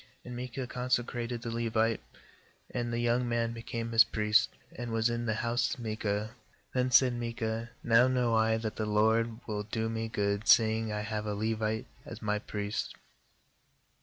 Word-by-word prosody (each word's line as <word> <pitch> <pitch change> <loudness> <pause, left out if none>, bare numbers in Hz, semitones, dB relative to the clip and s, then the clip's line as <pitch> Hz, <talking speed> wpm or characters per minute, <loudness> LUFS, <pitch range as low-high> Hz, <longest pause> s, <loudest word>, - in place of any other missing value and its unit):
12And 125 - -7
Micah 125 +1 -4
consecrated 120 -1 -2
the 115 - -3
Levite, 115 -1 +1 0.7
and 120 -1 -2
the 115 - -1
young 120 +1 +1
man 115 -1 0
became 115 0 -5
his 115 0 +8
priest, 105 -1 +2 0.3
and 120 -1 -5
was 115 +1 +2
in 120 0 -2
the 110 - +1
house 120 +4 +1
of - - -16
Micah. 110 -1 -2 0.4
"Then 125 0 +1
said 125 0 +6
Micah: 115 -1 -3
'Now 115 +2 +5
know 125 -2 +1
I 110 0 +3
that 110 -1 -4
the 110 - -1
LORD 110 +2 +2
will 105 -2 -2
do 110 +2 -2
me 115 0 -2
good, 100 -1 -1
seeing 110 -1 +5
I 105 0 -2
have 105 0 -3
a 105 - -1
Levite 110 +1 -1 0.2
as 115 - -8
my 105 -1 -1
priest.' 105 0 -4
115 Hz, 170 wpm, -31 LUFS, 110-120 Hz, 0.7 s, his